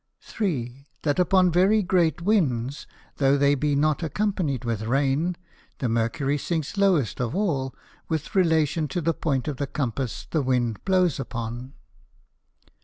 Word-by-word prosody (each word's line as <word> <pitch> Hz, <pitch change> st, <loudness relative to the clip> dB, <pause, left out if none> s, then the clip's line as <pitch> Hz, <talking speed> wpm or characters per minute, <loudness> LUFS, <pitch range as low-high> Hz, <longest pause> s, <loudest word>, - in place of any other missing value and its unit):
3. 140 Hz, -, -3 dB, 0.2 s
That 145 Hz, +2 st, +1 dB
upon 180 Hz, 0 st, +4 dB
very 195 Hz, +5 st, +4 dB
great 175 Hz, -2 st, +1 dB
Winds, 140 Hz, -, 0 dB, 0.3 s
though 140 Hz, 0 st, +3 dB
they 140 Hz, 0 st, +4 dB
be 145 Hz, +1 st, 0 dB
not 150 Hz, +1 st, +1 dB
accompanied 165 Hz, -, -1 dB
with 115 Hz, -3 st, -2 dB
Rain, 140 Hz, +8 st, 0 dB, 0.4 s
the 130 Hz, -, -1 dB
Mercury 115 Hz, +5 st, 0 dB
sinks 160 Hz, +1 st, -3 dB
lowest 185 Hz, -, +2 dB
of 125 Hz, +5 st, -2 dB
all, 145 Hz, -10 st, -1 dB, 0.3 s
with 160 Hz, -3 st, -3 dB
relation 160 Hz, -4 st, +2 dB
to 145 Hz, +6 st, -3 dB
the 165 Hz, +1 st, +1 dB
Point 140 Hz, -5 st, -1 dB
of 145 Hz, -3 st, -3 dB
the 140 Hz, -, -2 dB
Compass 130 Hz, -3 st, -3 dB
the 155 Hz, -, +1 dB
Wind 125 Hz, -4 st, 0 dB
blows 185 Hz, -6 st, +2 dB
upon. 120 Hz, 0 st, -5 dB
145 Hz, 145 wpm, -25 LUFS, 130-175 Hz, 0.4 s, upon